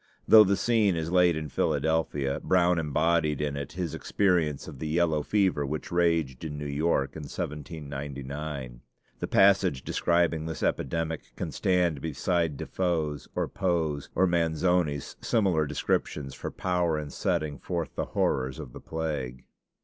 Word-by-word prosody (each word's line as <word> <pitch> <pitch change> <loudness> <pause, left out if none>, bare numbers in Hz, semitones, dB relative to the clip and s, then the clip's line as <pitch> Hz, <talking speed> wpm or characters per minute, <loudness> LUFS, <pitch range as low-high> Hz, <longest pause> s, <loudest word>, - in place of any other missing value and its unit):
Though 110 -1 +10
the 100 -1 +2
scene 110 -6 +2
is 80 0 -3
laid 90 -2 +4
in 75 -1 -4
Philadelphia, 75 -3 0
Brown 90 -1 +3
embodied 80 0 +1
in 75 -1 -1
it 70 -1 -5
his 85 -2 -3
experience 85 -8 +1
of 75 -5 -9
the 80 - -3
yellow 80 -1 +2
fever 95 -4 +1
which 75 +2 -4
raged 85 -7 +1
in 75 -2 -5
New 75 - -5
York 70 -1 0
in 80 - -6
1799. 70 -4 -6 0.4
The - - -2
passage 95 -9 +4
describing 85 -2 +1
this 80 -2 -5
epidemic 80 +2 -2
can - - -4
stand 90 -6 +1
beside 80 0 0
Defoe's 80 -5 -2
or - - 0
Poe's 80 -7 -1
or 95 - +4
Manzoni's 85 -3 +1
similar 95 -9 +2
descriptions, 70 -1 -1
for - - -5
power 90 -3 0
in 75 -1 -5
setting 80 -7 -1
forth 85 -3 -3
the - - -2
horrors 65 -1 0
of - - -8
the - - -9
plague. 75 -6 -4
80 Hz, 150 wpm, -28 LUFS, 75-85 Hz, 0.4 s, Though